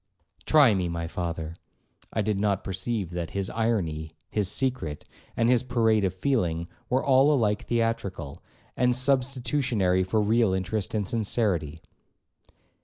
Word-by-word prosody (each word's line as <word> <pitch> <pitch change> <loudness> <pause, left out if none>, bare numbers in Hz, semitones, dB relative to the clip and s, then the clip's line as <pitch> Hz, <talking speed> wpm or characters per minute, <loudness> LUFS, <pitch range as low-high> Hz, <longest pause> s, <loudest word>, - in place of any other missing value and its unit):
'Try 145 -7 +6
me, 90 -3 -1
my 85 0 -3
father.' 85 -2 -4 0.6
I 110 - 0
did 105 -1 0
not 100 -2 0
perceive 95 0 -2
that 85 -2 -4
his 95 -1 -2
irony, 85 -9 -1 0.2
his 105 -3 0
secret, 125 - -2 0.3
and 115 - +3
his 125 -1 +4
parade 115 -4 +2
of 95 - +1
feeling, 90 -6 -1 0.2
were 130 +1 +1
all 135 +2 +5
alike 105 -7 +1
theatrical, 100 -10 -2 0.3
and 125 0 +2
substitutionary 125 -7 +1
for 95 +4 0
real 110 -1 +2
interest 95 +3 -2
and 105 -3 -1
sincerity. 95 -9 -1
105 Hz, 135 wpm, -26 LUFS, 90-120 Hz, 0.6 s, Try